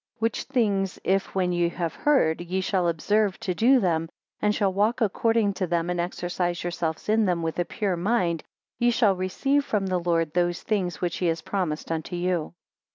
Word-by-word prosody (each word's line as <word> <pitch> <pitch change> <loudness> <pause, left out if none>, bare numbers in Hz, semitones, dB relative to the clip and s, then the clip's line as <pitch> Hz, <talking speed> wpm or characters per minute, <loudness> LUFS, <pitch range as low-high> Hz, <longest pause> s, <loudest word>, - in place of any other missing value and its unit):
8 - - -37
Which 225 -1 0
things 200 -8 0
if 195 0 0
when 180 -2 +1
you 175 -1 +1
have 170 -2 -3
heard, 220 - +2
ye 180 +2 -2
shall 185 -1 0
observe 200 +5 +1
to 185 - -1
do 250 +8 +4
them, 165 -5 0 0.3
and 210 0 +2
shall 195 -3 +1
walk 215 +5 +1
according 225 -1 +2
to 185 -1 -2
them, 170 0 0
and 175 - -2
exercise 175 0 -2
yourselves 170 -2 -3
in 220 +1 +3
them 175 -3 0
with 165 +1 -2
a 175 - +1
pure 195 -1 -1
mind, 175 -3 0 0.4
ye 240 - +4
shall 225 -5 +3
receive 270 +10 0
from 210 -7 -1
the 185 -1 0
Lord 165 -3 0
those 175 0 0
things 190 -5 -1
which 175 -2 -1
he 180 - 0
has 165 0 -1
promised 170 -6 -2
unto 165 +2 -3
you. 175 -2 -1
185 Hz, 200 wpm, -25 LUFS, 175-210 Hz, 0.4 s, do